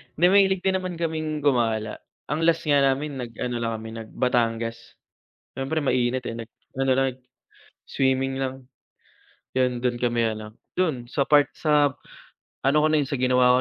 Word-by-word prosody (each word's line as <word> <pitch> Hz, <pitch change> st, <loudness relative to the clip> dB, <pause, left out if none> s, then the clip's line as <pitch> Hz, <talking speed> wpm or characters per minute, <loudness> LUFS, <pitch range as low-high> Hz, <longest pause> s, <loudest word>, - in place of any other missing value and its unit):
hindi 170 Hz, -, +3 dB
mahilig 190 Hz, -2 st, +4 dB
din 190 Hz, 0 st, +2 dB
naman 185 Hz, -1 st, -5 dB
kaming 155 Hz, -2 st, -2 dB
gumala. 115 Hz, -6 st, +1 dB, 0.3 s
Ang 160 Hz, +2 st, 0 dB
last 165 Hz, -1 st, +2 dB
nga 145 Hz, -2 st, +3 dB
namin 140 Hz, +1 st, 0 dB
nag-ano 120 Hz, 0 st, -4 dB
lang 115 Hz, -1 st, -1 dB
kami, 110 Hz, 0 st, -8 dB
nag-Batangas. 115 Hz, 0 st, -2 dB, 0.6 s
Siyempre 140 Hz, +4 st, -2 dB
mainit 125 Hz, -1 st, +1 dB
eh, 115 Hz, -, -3 dB
nag-ano 130 Hz, +3 st, -4 dB
lang, 135 Hz, -, +3 dB, 0.8 s
swimming 135 Hz, 0 st, +1 dB
lang. 130 Hz, -1 st, -4 dB, 0.9 s
Yun, 125 Hz, -2 st, +1 dB
dun 120 Hz, -1 st, 0 dB
kami 120 Hz, -2 st, +1 dB
ano, 110 Hz, 0 st, -9 dB, 0.2 s
dun, 140 Hz, -10 st, 0 dB
sa 140 Hz, +1 st, 0 dB
part 145 Hz, -2 st, +5 dB
sa 150 Hz, -2 st, +3 dB, 0.8 s
ano 140 Hz, +2 st, +4 dB
ko 155 Hz, -, +4 dB
na 155 Hz, -, +3 dB
yun, 145 Hz, -, +1 dB
sa 135 Hz, +1 st, -3 dB
ginawa 125 Hz, -1 st, +4 dB
135 Hz, 155 wpm, -25 LUFS, 120-150 Hz, 0.9 s, part